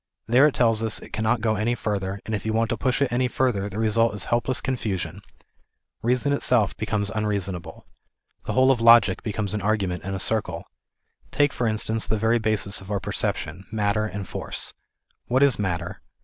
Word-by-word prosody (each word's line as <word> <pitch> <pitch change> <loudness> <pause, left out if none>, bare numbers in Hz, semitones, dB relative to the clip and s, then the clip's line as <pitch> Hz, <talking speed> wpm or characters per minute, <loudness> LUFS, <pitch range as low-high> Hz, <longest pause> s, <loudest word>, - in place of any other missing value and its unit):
There 130 +6 +5
it 150 - -2
tells 115 -3 +3
us 110 -1 +2
it - - -13
cannot 110 +1 0
go 110 -1 +1
any 110 +3 0
further, 100 -3 -3
and 110 - -4
if 105 - -2
you 110 - -2
want 115 +1 +1
to - - +1
push 130 +3 0
jt 135 - -1
any 125 +1 +1
further, 120 -6 0
the 100 - -8
result 115 0 +2
is 100 - -2
helpless 120 +2 0
confusion; 100 - -3 0.8
reason 125 +4 +1
itself 125 -7 +2
becomes 105 -2 -2
unreasonable. 100 -4 -3 0.6
The - - -2
whole 130 +1 +5
of 120 -3 0
logic 115 -4 +6
becomes 105 -2 -2
an 105 - -2
argument 95 -3 -1
in 95 +1 -4
a - - -2
circle. 95 -4 0 0.7
Take 145 -1 +2
for 120 - -1
instance 110 0 0
the 110 - 0
very 115 +3 +2
basis 105 -3 0
of 95 - -12
our 100 -1 -1
perception, 85 +2 -3
matter 105 0 0
and 100 -2 -6
force. - - -4 0.5
What 130 +3 +3
is 140 -5 +3
matter 90 -2 -3
110 Hz, 190 wpm, -24 LUFS, 100-120 Hz, 0.8 s, logic